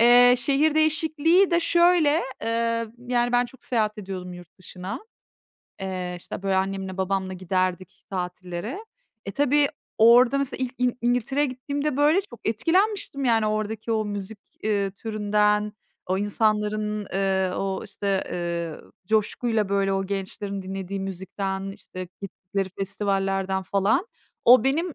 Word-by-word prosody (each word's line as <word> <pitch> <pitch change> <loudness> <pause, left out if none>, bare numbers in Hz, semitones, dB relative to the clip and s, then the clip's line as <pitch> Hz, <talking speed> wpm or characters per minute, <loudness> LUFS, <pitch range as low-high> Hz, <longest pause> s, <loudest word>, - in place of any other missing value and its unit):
Eee, 245 +1 +8
şehir 285 +5 +2
değişikliği 315 +4 +3
de 340 0 +3
şöyle, 340 -2 +4 0.2
eee, 230 0 0
yani, 245 0 0
ben 245 0 +4
çok 260 +1 -15
seyahat 215 -3 0
ediyordum 185 -2 -6
yurt 175 -1 -12
dışına. 185 +4 -7 0.8
Eee, 185 -2 -3
işte, 175 - -8
böyle, 195 -1 +1
annemle 190 0 -2
babamla 190 0 -1
giderdik 185 0 -2
tatillere. 180 - -5 0.4
E, - - -2
tabii 290 +1 +3 0.3
orada, 240 +4 +6
mesela, 265 -1 -1
ilk 255 +1 -7
İn 250 0 +3
İn - - -4
İngiltere'ye 250 +4 +1
gittiğimde, 280 +2 -3
böyle, 300 +6 +4
çok 255 - -14
etkilenmiştim, 330 - +1
yani, 225 -3 +3
oradaki 215 +1 -2
o 215 -1 +1
müzik, 205 0 -5 0.3
ııı, 200 -2 +1
türünden, 210 0 +1 0.3
o 185 +1 0
insanların, 210 0 0
ııı, 190 -1 +1
o, 195 -1 -2
işte, 200 -2 -1
ııı, 170 -2 -4
coşkuyla, 220 +1 +1
böyle, 195 0 +1
o 195 0 -1
gençlerin 200 0 -4
dinlediği 195 +1 -5
müzikten, 190 +1 -4
işte, 185 -3 -9
gittikleri 195 0 -4
festivallerden, 195 -1 0
falan. 200 - +1 0.4
O 250 +2 +7
benim, 315 +5 0
210 Hz, 135 wpm, -25 LUFS, 190-250 Hz, 0.8 s, Eee